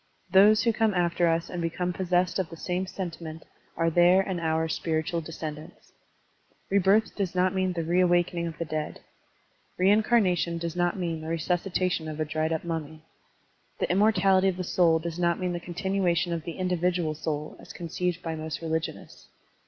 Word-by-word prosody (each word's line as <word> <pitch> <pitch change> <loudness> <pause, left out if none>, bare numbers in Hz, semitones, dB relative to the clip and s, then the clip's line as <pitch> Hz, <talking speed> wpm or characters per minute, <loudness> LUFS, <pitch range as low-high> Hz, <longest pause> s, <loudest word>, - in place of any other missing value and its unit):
Those 205 +3 +6
who 230 -2 +2
come 220 -2 +1
after 175 -1 +2
us 165 0 +1
and 175 - -5
become 170 +2 -2
possessed 180 0 0
of 185 - -1
the 165 - -10
same 180 +3 -2
sentiment 165 -4 -6 0.3
are 165 0 +2
their 175 +3 +5
and 190 -2 -3
our 160 0 0
spiritual 160 +2 -1
descend 155 -1 -6
ants. 160 +3 -16 0.8
Rebirth 200 +3 +3
does 190 -3 -2
not 180 +1 +2
mean 185 -1 0
the 170 -1 -2
reawakening 175 0 +2
of 165 -1 -7
the 170 - -3
dead. 155 -1 -4 0.8
Reincarnation 190 -3 +3
does 170 0 -4
not 175 +1 0
mean 165 -3 -3
the 160 - -7
resuscitation 175 +1 -1
of 155 0 -6
a 155 - 0
dried 155 +1 -1
up 160 - -1
mummy. 160 -2 -5 0.8
The - - +1
immor 210 +4 +4
tality 195 -1 +3
of 185 - -3
the 185 - -2
soul 170 -2 +3
does 165 +1 -5
not 170 -1 +1
mean 180 -1 -1
the 175 - -3
continuation 175 -1 -1
of 165 -2 -4
the 170 - -4
individual 180 -3 0
soul 155 0 -4
as - - -12
conceived 180 +1 -3
by 165 - -3
most 155 -1 -5
religionists. 160 0 -4
175 Hz, 180 wpm, -27 LUFS, 160-185 Hz, 0.8 s, Those